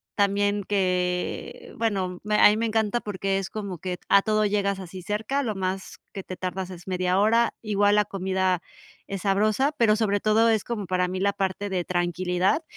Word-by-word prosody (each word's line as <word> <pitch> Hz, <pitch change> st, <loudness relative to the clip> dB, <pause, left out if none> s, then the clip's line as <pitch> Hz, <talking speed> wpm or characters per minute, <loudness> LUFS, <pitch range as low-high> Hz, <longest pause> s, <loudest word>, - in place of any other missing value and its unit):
también 205 Hz, 0 st, +1 dB
que, 180 Hz, -2 st, -2 dB
bueno, 190 Hz, -5 st, -1 dB
me 210 Hz, 0 st, 0 dB
a -, -, +9 dB
mí 210 Hz, -, +1 dB
me 230 Hz, +1 st, 0 dB
encanta 220 Hz, +1 st, +1 dB
porque 195 Hz, -2 st, -2 dB
es 195 Hz, -, -5 dB
como 200 Hz, -5 st, -6 dB
que 180 Hz, +1 st, -4 dB
a 200 Hz, -, +6 dB
todo 215 Hz, 0 st, +1 dB
llegas 200 Hz, -1 st, 0 dB
así 185 Hz, 0 st, -8 dB
cerca, 210 Hz, +9 st, -1 dB
lo 220 Hz, -6 st, -2 dB
más 190 Hz, 0 st, -4 dB
que 195 Hz, -, -6 dB
te 185 Hz, -, -7 dB
tardas 185 Hz, 0 st, -4 dB
es 175 Hz, -2 st, -10 dB
media 185 Hz, 0 st, 0 dB
hora. 230 Hz, +3 st, +3 dB
Igual 205 Hz, -1 st, +2 dB
la 210 Hz, -1 st, +3 dB
comida 190 Hz, -2 st, 0 dB, 0.5 s
es 195 Hz, -2 st, -5 dB
sabrosa, 215 Hz, +8 st, +2 dB
pero 220 Hz, -3 st, +4 dB
sobre 210 Hz, -2 st, +1 dB
todo 220 Hz, +2 st, +3 dB
es 220 Hz, -3 st, +2 dB
como 225 Hz, -4 st, -4 dB
para 180 Hz, 0 st, 0 dB
mí 185 Hz, +1 st, -4 dB
la 200 Hz, +1 st, +1 dB
parte 200 Hz, 0 st, -2 dB
de 185 Hz, -2 st, -1 dB
tranquilidad, 180 Hz, -, 0 dB
200 Hz, 195 wpm, -25 LUFS, 185-210 Hz, 0.5 s, a